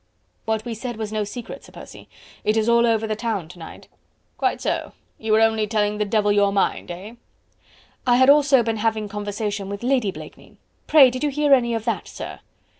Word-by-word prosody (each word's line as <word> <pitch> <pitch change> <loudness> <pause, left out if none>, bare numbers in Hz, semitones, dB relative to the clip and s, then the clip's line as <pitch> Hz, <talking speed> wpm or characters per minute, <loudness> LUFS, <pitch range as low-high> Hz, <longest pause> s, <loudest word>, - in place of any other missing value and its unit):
"What 220 0 -1
we 235 - -4
said 235 +1 -6
was 215 -1 -4
no 215 -1 0
secret, 225 +3 -8
Sir - - -15
Percy. - - -13 0.3
It 215 +1 +1
is 220 0 +1
all 235 0 +4
over 225 -1 +1
the 215 -1 -2
town 215 -6 -3
to 180 0 -13
night." 160 - -11 0.5
"Quite - - -1
so... - - -3 0.3
you 220 0 -3
were 215 +1 +5
only 220 -1 +2
telling 210 -1 0
the 210 - +1
devil 210 0 +1
your 205 -1 +3
mind... 200 -2 0
eh?" 185 +6 -8 0.9
"I 245 - +5
had 260 +1 +5
also 280 -3 +5
been 225 -1 -2
having 220 -1 -1
conversation 205 -1 -4
with 200 +2 -6
Lady 250 -4 +1
Blakeney.... 185 - -11 0.3
Pray 275 -5 +7
did 255 +3 -5
you 295 - +2
hear 290 0 +2
any 240 -3 +3
of 225 -1 -4
that, 230 - -2
sir?" - - -8
220 Hz, 205 wpm, -22 LUFS, 210-240 Hz, 0.9 s, Pray